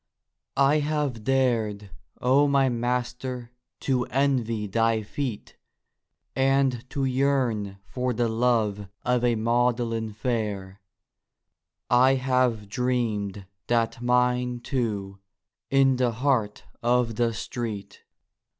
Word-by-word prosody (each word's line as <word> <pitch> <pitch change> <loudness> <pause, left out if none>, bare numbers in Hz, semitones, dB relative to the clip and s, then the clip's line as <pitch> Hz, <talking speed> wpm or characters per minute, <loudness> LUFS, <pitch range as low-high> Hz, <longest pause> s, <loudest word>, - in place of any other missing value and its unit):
I 140 +2 +4
have 145 -6 -1
dared, 115 -6 0 0.3
O 135 +4 +4
my 135 -1 +3
Master, 125 0 -3 0.3
to 130 -2 +1
envy 125 -5 0
thy 115 +2 +1
feet, 120 0 -5 0.8
And 135 -2 +1
to 135 0 -1
yearn 125 -7 0
for 125 +8 -2
the 120 0 0
love 110 -3 +1 0.2
of 125 -1 +1
a 120 -1 +3
Magdalen 115 -1 0
fair; 105 -5 -3 1.1
I 130 +2 +5
have 125 -5 +1
dreamed 105 -4 -1 0.2
that 115 0 0
mine, 125 0 +1
too, 105 -8 -3 0.5
in 135 -1 +4
the 125 -2 +1
heart 115 -4 0 0.2
of 120 -1 +2
the 120 -1 +2
street. 110 -3 -5
120 Hz, 105 wpm, -26 LUFS, 110-130 Hz, 1.1 s, I